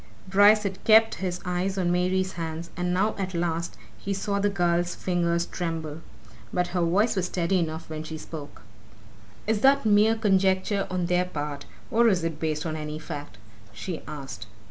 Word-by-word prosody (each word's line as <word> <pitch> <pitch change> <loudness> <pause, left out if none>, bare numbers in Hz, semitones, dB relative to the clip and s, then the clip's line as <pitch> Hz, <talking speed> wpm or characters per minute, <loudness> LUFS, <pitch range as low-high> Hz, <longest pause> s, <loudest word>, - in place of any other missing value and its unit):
Bryce 205 +3 +6
had 195 -2 -4
kept 225 0 +6
his 180 -1 -2
eyes 180 +2 -1
on 175 -2 +1
Mary's 185 +1 +1
hands, 165 0 -5
and 180 0 -1
now 195 +4 +2
at 190 -2 -3
last 170 0 -2 0.2
he 195 0 -2
saw 200 +1 -1
the 205 +1 +2
girl's 175 -2 +1
fingers 170 -1 0
tremble. 165 -3 -4 0.5
But 180 -1 0
her 180 0 -1
voice 200 +7 +2
was 185 -2 0
steady 180 +1 +1
enough 160 -1 -3
when 155 -1 -5
she 155 0 -6
spoke. 150 -2 -9 0.8
"Is 215 -1 0
that 270 -1 +5
mere 215 +1 +5
conjecture 195 -1 +2
on 185 -1 -1
their 180 +1 +2
part, 150 -4 -5 0.2
or 235 +1 +4
is 185 -6 +2
it 165 -2 -3
based 155 -1 -2
on 160 -1 -2
any 150 0 -4
fact?" 145 -7 -7 0.4
she 180 -4 -5
asked. 135 -6 -7
180 Hz, 175 wpm, -26 LUFS, 165-195 Hz, 0.8 s, Bryce